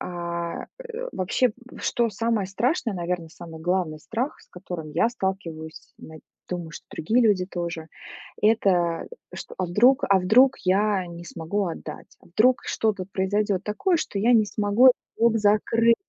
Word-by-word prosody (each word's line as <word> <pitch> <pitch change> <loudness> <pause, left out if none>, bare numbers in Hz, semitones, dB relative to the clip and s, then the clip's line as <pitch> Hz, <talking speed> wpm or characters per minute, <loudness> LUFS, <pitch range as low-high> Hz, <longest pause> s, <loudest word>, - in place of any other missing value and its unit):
А, 170 -1 -4
э, - - -6
вообще, 200 +7 +1 0.3
что 235 -1 0
самое 220 -1 0
страшное, 230 - -1
наверно, 175 -1 -3
самый 165 0 -11
главный 175 -2 -1
страх, 235 - -3
с - - -22
которым 175 -4 -7
я 170 +9 +3
сталкиваюсь, 175 -7 -5
над 160 -1 -12 0.3
думаю, 175 -3 -4
что - - -11
другие 220 +10 +1
люди 205 -5 +3
тоже 170 -3 -5 0.5
это, 185 -6 +2 0.3
что - - -8
а 185 - 0
вдруг 245 +10 +4
а 195 -1 +5
вдруг 245 +9 +5
я 195 0 +2
не 170 0 -9
смогу 175 +5 -3
отдать, 165 - -8
а - - -19
вдруг 230 +8 +3
что-то 210 -4 -1
произойдёт 195 0 0
такое, 340 - +1
что 205 - -3
я 230 +5 +3
не 220 -3 +5
смогу 205 +4 +3
этот 255 - +8 0.2
долг 230 -1 +4
закрыть. 225 +3 +3
195 Hz, 155 wpm, -25 LUFS, 175-225 Hz, 0.5 s, этот